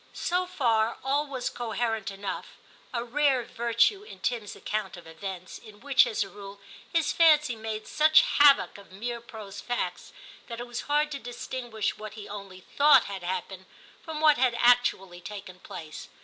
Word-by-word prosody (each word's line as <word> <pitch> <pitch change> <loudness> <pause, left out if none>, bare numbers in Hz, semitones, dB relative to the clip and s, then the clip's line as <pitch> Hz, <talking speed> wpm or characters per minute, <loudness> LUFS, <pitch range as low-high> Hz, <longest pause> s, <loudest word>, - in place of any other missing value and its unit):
So 360 +1 0
far 230 -10 +1
all 285 +3 0
was 260 -3 -3
coherent 225 -3 -2
enough, 195 0 -6 0.3
a 235 -3 -2
rare 270 0 +2
virtue 235 - +1
in 425 - -12
Tim's 225 -5 -2
account 215 -3 -4
of 175 - -12
events, 185 +3 -7
in 210 -2 -15
which, 270 0 +4
as 220 -3 0
a - - -9
rule, 200 0 -11 0.3
his 330 -3 +1
fancy 305 -6 +5
made 220 -1 -5
such 310 +1 +5 0.2
havoc 285 -7 +6
of 200 - -16
mere 235 +5 -5
prose 220 -5 -9
facts, 245 0 -3 0.4
that 235 0 -6
it 240 - -5
was 240 0 -5
hard 295 +1 +2
to 280 - -4
distinguish 240 -3 -4
what 215 0 -8
he 210 -2 -9
only 195 -2 -9
thought 285 +4 +5
had 195 -2 -6
happened 185 +1 -5 0.3
from 320 -2 -6
what 305 -4 +5
had 250 -2 +3
actually 240 -8 +3
taken 190 -1 -9
place. 160 -4 -9
235 Hz, 170 wpm, -27 LUFS, 200-275 Hz, 0.4 s, havoc